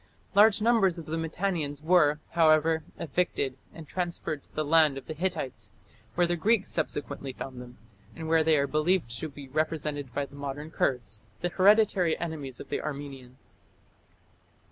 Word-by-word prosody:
Large 210 +1 +6
numbers 220 -7 +3
of 165 - -7
the 155 - -3
Mitannians 160 -3 -2
were, 155 -3 +4
however, 160 -1 +4 0.2
evicted 145 -4 -1 0.2
and 160 -2 -11
transferred 170 -4 -3
to - - -22
the 155 - -1
land 155 -2 +4
of 135 - -8
the 155 - -5
Hittites, 135 - -3 0.4
where 175 - +4
the 175 0 0
Greeks 205 +4 +2
subsequently 140 -2 -3
found 130 -1 -7
them, 125 0 -12 0.4
and 160 0 -6
where 160 0 +4
they 160 -1 +4
are 140 - +2
believed 155 -2 +1
to 160 - -3
be 140 -1 -11
represented 150 -2 -2
by 140 +3 -2
the 140 - -18
modern 145 +2 -6
Kurds, 115 -8 -1 0.2
the 175 - 0
hereditary 195 -2 +4
enemies 150 -7 -5
of - - -9
the - - -2
Armenians. 135 -3 -8
155 Hz, 165 wpm, -28 LUFS, 140-175 Hz, 0.4 s, Large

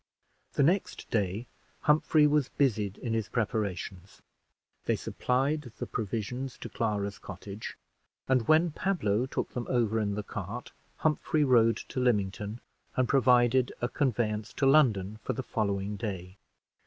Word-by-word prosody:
The 140 - +3
next 180 +7 +1
day 105 +1 0 0.4
Humphrey 150 0 +4
was 150 -2 +3
busied 105 -8 0
in 115 -3 -3
his 110 -2 -1
preparations. 100 -4 -3 0.6
They - - +2
supplied 135 0 -1
the - - -3
provisions 115 +5 -3
to - - -7
Clara's 105 -3 -2
cottage; 100 +2 -8 0.5
and 130 -4 +2
when 160 +2 +5
Pablo 130 - 0
took - - -3
them 125 - -3
over 115 -3 +2
in 100 -2 0
the 105 - -3
cart, 105 +4 -6 0.3
Humphrey 155 0 +1
rode 115 -4 +5
to - - -5
Lymington 105 -2 0 0.3
and 130 -1 +2
provided 125 -1 +4
a 120 - 0
conveyance 115 -6 -1
to 140 - 0
London 110 -8 +4
for - - -2
the 130 - -4
following 100 -3 -1
day. 95 -4 -5
115 Hz, 140 wpm, -29 LUFS, 105-130 Hz, 0.6 s, when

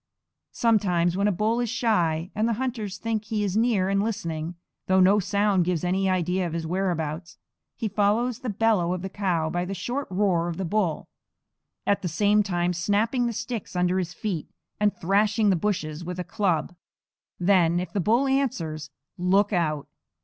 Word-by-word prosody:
Sometimes 180 -7 +2
when 200 +2 +2
a - - +3
bull 215 +5 0
is 240 -2 -1
shy, 185 -8 0
and 215 +2 0
the - - +1
hunter 240 -5 -2
thinks 215 +2 -3
he 215 -2 0
is 195 -2 -1
near 220 -4 +2
and 195 0 +1
listening, 170 -6 -3 0.3
though 190 0 +4
no 195 +3 +5
sound 200 -1 +2
gives 175 -2 -1
any 190 +2 +1
idea 180 0 0
of 165 - -6
his 165 -1 -3
whereabouts, 165 -2 -2 0.4
he 225 - -2
follows 215 +4 +1
the 255 - -4
bellow 210 -4 +2
of 180 - -6
the 190 - -5
cow 180 -6 0
by 175 0 -1
the 195 +2 -4
short 245 +10 -3
roar 185 -3 +1
of 170 -1 -4
the 190 - -2
bull, 175 -4 -1 0.8
at 200 - +2
the 185 - -2
same 205 +5 +3
time 180 -3 0
snapping 215 +8 +1
the - - -1
sticks 235 -3 -5
under 180 +1 +2
his 175 -2 -3
feet, 175 -2 -4 0.3
and 210 -1 +1
thrashing 205 +3 +2
the - - +3
bushes 165 -4 -2
with 180 +1 -5
a - - -1
club. 180 -2 -1 0.7
Then, 175 -2 +3
if 180 - -5
the 205 - 0
bull 230 +9 +2
answers, 165 - -1 0.3
look 195 +4 +2
out. 155 -5 0
190 Hz, 185 wpm, -25 LUFS, 175-210 Hz, 0.8 s, no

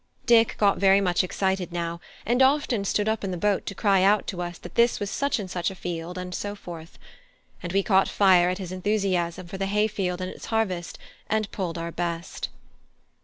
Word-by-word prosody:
Dick 230 -2 +5
got 200 -2 +3
very 195 0 +5
much 180 -2 +2
excited 190 -1 -1
now, 170 0 -3 0.2
and 245 +3 +2
often 265 -5 +3
stood 205 +1 0
up 220 -1 0
in 195 - -2
the 180 - -3
boat 205 +2 0
to 200 - -4
cry 195 -2 +3
out 200 +2 +4
to 180 -2 -4
us 175 -1 -5
that 175 - -11
this 235 0 +3
was 205 0 -3
such 280 0 0
and 205 -4 -4
such 180 -1 -2
a 190 - -8
field, 175 0 -5
and 180 0 -5
so 205 +3 -4
forth; 170 -4 -10 0.6
and 175 - -5
we 195 +1 +2
caught 190 -1 +3
fire 185 -3 +5
at 180 - -1
his 185 -3 -6
enthusiasm 185 -3 -1
for 190 +2 -8
the 195 - 0
hay 210 +2 +2
field 190 -4 -2
and 185 0 -4
its - - -10
harvest, 190 -6 -2 0.3
and 215 -2 0
pulled 175 -4 -3
our 170 0 -4
best. 170 0 -4
190 Hz, 215 wpm, -25 LUFS, 175-205 Hz, 0.6 s, Dick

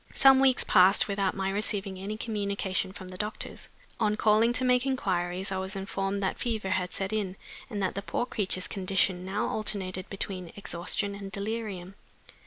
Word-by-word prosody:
Some 270 -1 +7
weeks 265 -1 +4
passed 190 +2 +5
without 200 -2 0
my 195 0 -1
receiving 200 -2 -2
any 205 +3 -4
communication 200 -4 -1
from 185 -1 -9
the 185 0 -9
doctors. 210 +1 -4 0.3
On 210 0 +2
calling 220 +2 +4
to 255 +1 +2
make 250 0 +4
inquiries 190 -7 -1
I 190 - -1
was 190 +2 -3
informed 195 0 -2
that 190 - -1
fever 220 -5 -2
had 185 -1 0
set 195 +2 -2
in, 200 -4 -1 0.3
and 205 -4 -2
that 185 - 0
the 200 - -3
poor 240 - -1
creature's 190 -6 -1
condition 190 -1 +1
now 195 +3 -1
alternated 190 -4 -2
between 185 -3 -4
exhaustion 200 +2 -1
and 200 -1 -7
delirium. 200 -3 -4
200 Hz, 175 wpm, -29 LUFS, 190-215 Hz, 0.3 s, Some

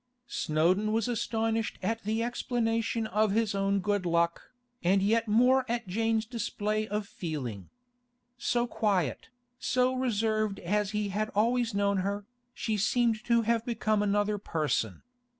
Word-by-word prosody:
Snowdon 185 +4 +1
was 225 +1 +1
astonished 225 -1 -1
at 225 0 -1
the 220 +2 0
explanation 230 -1 -1
of 215 0 +1
his 225 -1 +1
own 195 0 +1
good 205 -1 0
luck, 170 -1 0 0.3
and 190 +3 +4
yet 225 +3 +2
more 250 +5 +4
at 235 0 -1
Jane's 225 +3 0
display 215 -2 -2
of 210 0 -3
feeling. 130 - -5 0.7
So 240 0 0
quiet, 195 - -1 0.3
so 255 0 +2
reserved 215 -4 0
as 205 +3 0
he 210 -1 -1
had 215 +2 -1
always 230 +1 +2
known 200 0 +2
her, 200 +2 -2 0.3
she 220 -3 -2
seemed 230 +2 +1
to 235 -1 +3
have 230 0 +1
become 215 -3 0
another 205 0 +1
person. 150 - -1
215 Hz, 140 wpm, -29 LUFS, 200-230 Hz, 0.7 s, and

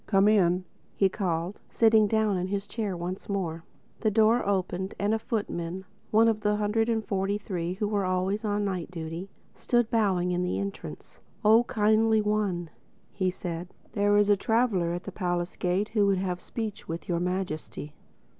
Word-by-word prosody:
"Come 195 -1 +4
in," 185 -4 +3 0.3
he 195 - +3
called, 180 -1 -2
sitting 220 -2 +4
down 220 -1 +2
in 180 0 -1
his 200 +1 -2
chair 205 -5 -3
once 180 +4 -5
more. 170 -5 -2 0.4
The 220 - +2
door 220 +3 +4
opened 190 -1 -1
and 205 +2 +1
a 225 - +1
footman—one 200 0 -1
of 220 -1 +1
the 210 0 +2
hundred 210 +2 +1
and 220 -2 0
forty 195 +1 0
three 180 -4 -3
who 205 +3 -2
were 205 -1 0
always 185 +3 0
on 205 -1 0
night 185 -4 -3
duty—stood 180 +7 -3
bowing 190 -6 +2
in 180 0 0
the 180 0 -1
entrance. 200 0 -6 0.3
"Oh, 225 +3 +6
Kindly 220 +1 +3
One," 205 -6 -1 0.6
said 175 -1 -5
he, - - -30
"there 205 0 +3
is 205 0 +4
a 205 - +6
traveler 205 -5 +1
at 175 +2 -4
the - - -6
palace 175 -2 -2
gate 185 +4 0
who 210 -3 +2
would 195 -1 +3
have 180 -1 -2
speech 215 -3 -5
with 165 +1 -5
Your 170 -2 0
Majesty." 175 -5 -3
200 Hz, 175 wpm, -28 LUFS, 180-215 Hz, 0.6 s, Oh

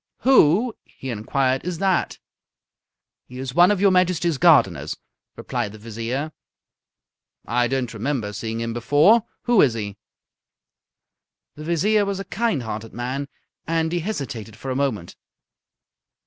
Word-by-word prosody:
"Who," 230 - +4
he 130 - -8
inquired, 130 +4 0
"is 180 -1 -4
that?" 190 0 0 1.1
"He 125 - -11
is 130 -1 -5
one 175 +4 +6
of 205 -2 +1
your 200 0 +4
Majesty's 175 -4 +1
gardeners," 95 - +3 0.4
replied 120 -5 -4
the - - -10
Vizier. 115 +7 -4 1.1
"I 120 +1 +1
don't 130 -2 -2
remember 115 -2 -3
seeing 110 +2 -4
him 115 0 -3
before. 145 - +4 0.2
Who 240 -4 +4
is 125 -5 +3
he?" 105 -2 -5 1.6
The 150 - -10
Vizier 205 +6 +2
was 200 -1 -2
a 195 - -5
kind 195 - -1
hearted 110 0 -6
man, 130 +4 -3 0.4
and 165 0 0
he 175 - 0
hesitated 135 - -5
for 135 +2 -5
a - - -2
moment. 125 -11 -2
135 Hz, 135 wpm, -22 LUFS, 115-175 Hz, 1.6 s, one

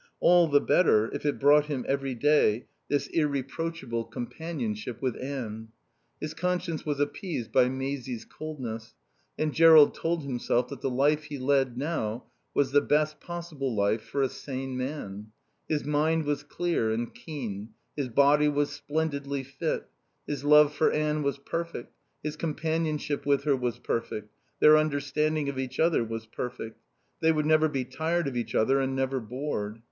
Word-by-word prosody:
All 175 -1 +6
the 145 -2 +5
better 110 -12 +3
if - - -3
it 145 - 0
brought 145 +1 +6
him 140 -5 -3
every 135 -1 -1
day 125 -4 +3 0.2
this 145 - +1
irreproachable 140 -4 -2
companionship 120 -2 -5
with 130 -3 -1
Anne. 115 -5 -5 0.5
His 155 0 -4
conscience 180 -1 -2
was 145 -2 -2
appeased 145 - -3
by 125 -1 +4
Maisie's 130 -2 -4
coldness, 125 -8 -7 0.4
and 155 -1 0
Jerrold 160 -3 +8
told 165 -1 -1
himself 125 -2 0
that 135 -1 -8
the 135 - 0
life 145 +4 +2
he 145 -1 -6
led 135 -2 +1
now 130 -6 -2 0.3
was 135 -2 +2
the 145 +1 +5
best 150 +1 +1
possible 165 -8 -4
life 105 +2 +1
for 140 +4 -2
a 135 - +1
sane 130 -1 -5
man. 125 -6 -5 0.4
His 150 -2 0
mind 155 +2 +1
was 145 -1 0
clear 145 -6 -1
and 115 +2 -2
keen; 115 - -6 0.2
his 140 -4 -2
body 145 +4 +4
was 145 0 0
splendidly 145 -2 -2
fit; 135 +4 -3 0.4
his 145 -2 -4
love 150 0 +6
for 155 - +2
Anne 150 0 0
was 140 -1 -1
perfect, 165 -2 -5 0.3
his 150 0 -3
companionship 155 -2 -2
with 140 -1 +3
her 145 -2 +3
was 125 -3 -2
perfect, 110 -2 -3 0.3
their 155 0 +8
understanding 150 0 0
of 140 -2 -3
each 130 0 -4
other 165 -6 +3
was 115 0 -5
perfect. 115 -1 -6 0.4
They 160 0 +4
would 155 -1 0
never 155 0 +4
be 135 -4 -2
tired 160 +5 -1
of 135 - -4
each 120 -1 -3
other 135 +5 +3
and 135 0 -1
never 135 0 0
bored. 115 -3 -4
140 Hz, 160 wpm, -28 LUFS, 125-155 Hz, 0.5 s, Jerrold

